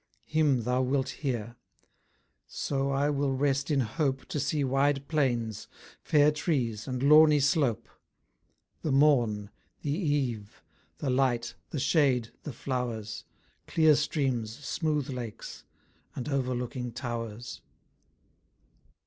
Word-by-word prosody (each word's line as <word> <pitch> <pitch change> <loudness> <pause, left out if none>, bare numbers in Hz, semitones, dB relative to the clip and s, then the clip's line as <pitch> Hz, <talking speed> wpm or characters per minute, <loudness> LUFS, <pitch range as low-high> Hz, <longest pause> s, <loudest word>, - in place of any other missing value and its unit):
Him 150 -6 +2
thou 125 +2 +1
wilt 130 +1 0
hear; 120 -4 -4 0.9
so 135 -1 -2
I 140 +2 +1
will 140 -1 0
rest 140 +1 +1
in 145 -3 +2
hope 135 +3 -1
To 150 - -2
see 145 +2 0
wide 135 +1 +1
plains, 120 -8 -1 0.3
fair 150 0 +4
trees 130 - -1
and 130 0 -3
lawny 150 +1 +7
slope: 140 -4 +1 0.9
The 155 - -1
morn, 120 -8 +3 0.3
the 145 - -1
eve, 140 - -2 0.3
the 135 - -2
light, 125 -2 +1 0.2
the 150 - -3
shade, 135 -5 +2
the 150 - -6
flowers: 120 -4 -4 0.4
Clear 160 -2 +5
streams, 135 -6 0
smooth 150 -4 -1
lakes, 120 -4 -7 0.5
and 125 - -5
overlooking 125 -2 -2
towers. 120 -2 -5
135 Hz, 115 wpm, -29 LUFS, 120-145 Hz, 0.9 s, lawny